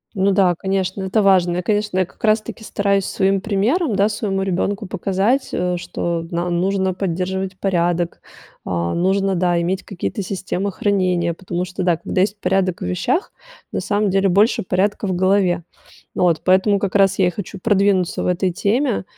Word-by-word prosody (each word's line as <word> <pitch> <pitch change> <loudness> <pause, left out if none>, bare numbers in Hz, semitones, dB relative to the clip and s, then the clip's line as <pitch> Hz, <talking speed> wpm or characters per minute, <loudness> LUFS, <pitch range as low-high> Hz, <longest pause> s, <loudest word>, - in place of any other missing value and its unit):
Ну 195 0 +2
да, 185 -2 +3
конечно, 190 0 -2
это 190 +3 +1
важно. 180 -3 +3
Я, 180 - 0
конечно, 210 -1 0
я 185 - +2
как - - -24
раз 215 0 +3
таки 220 - -9
стараюсь 200 -2 0
своим 195 -1 +1
примером, 220 - 0
да, 200 +1 +3
своему 205 -3 -2
ребенку 195 +2 -1
показать, 195 +7 0
э, 180 0 -1
что 170 -1 -3
на 175 +1 -1
нужно 190 +2 0
поддерживать 185 +1 -3
порядок, 175 -2 0 0.4
а 85 -1 -1
нужно, 190 +2 +1
да, 175 -1 +1
иметь 185 +2 -1
какие-то 200 +2 -4
системы 195 +1 -3
хранения, 180 -4 0
потому 175 0 -4
что, 185 0 -5
да, 175 -3 +2
когда 185 +2 -1
есть 205 +1 0
порядок 185 -2 0
в - - -3
вещах, 240 - -1 0.4
на - - -2
самом 205 0 0
деле 195 +1 +2
больше 205 +6 +3
порядка 200 +3 0
в 185 - -1
голове, 185 -2 +2 0.5
ну - - +1
вот. 170 -3 +2
Поэтому 190 +2 +3
как 195 0 -3
раз 195 -1 +3
я 185 - +4
и - - +3
хочу 195 +1 -7
продвинуться 195 -3 +1
в - - -1
этой 180 +1 +1
теме, 230 +7 0
190 Hz, 180 wpm, -20 LUFS, 180-200 Hz, 0.5 s, я